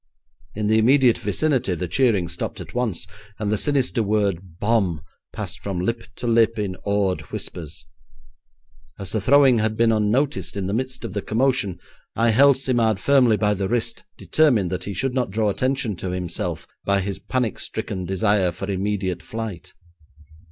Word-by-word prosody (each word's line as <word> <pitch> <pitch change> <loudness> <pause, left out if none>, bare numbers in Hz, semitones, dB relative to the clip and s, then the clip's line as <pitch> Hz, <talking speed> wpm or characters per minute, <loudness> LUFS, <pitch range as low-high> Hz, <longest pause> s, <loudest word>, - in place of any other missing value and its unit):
In 105 0 -2
the 110 +1 +3
immediate 125 +1 +4
vicinity 120 - 0
the 90 +2 -3
cheering 105 -5 +2
stopped - - -4
at - - -9
once, 120 -7 0 0.3
and 105 -1 -2
the - - +3
sinister 135 -4 +1
word 100 -5 -1
'bomb' 100 -8 +1 0.3
passed - - -5
from 95 -3 -3
lip 115 +5 -2
to 125 - -7
lip 115 -1 +3
in 100 -3 -2
awed 100 -2 0
whispers. 80 -4 -6 1.1
As 100 -1 -5
the 110 - -1
throwing 135 0 +5
had 110 0 0
been 115 0 +4
unnoticed 105 - 0
in 95 - -2
the 100 - -2
midst 130 +1 -3
of - - -6
the 100 - -2
commotion, 120 -4 0 0.4
I 115 0 +3
held 135 +4 +6
Simard 120 -6 +1
firmly 125 -3 +4
by 105 -1 +2
the 95 -1 -2
wrist, 115 - -1
determined 115 - +2
he 100 - -4
should 130 +7 -1
not 125 -4 0
draw 105 +1 +1
attention 130 -1 -1
to 95 - -4
himself 90 -2 -3 0.2
by 100 0 +2
his 95 0 -4
panic 115 +2 -2
stricken 95 -2 -4
desire 95 0 +1
for 95 +3 -5
immediate 95 -1 -2
flight. 110 -6 -7
105 Hz, 165 wpm, -23 LUFS, 95-120 Hz, 1.1 s, held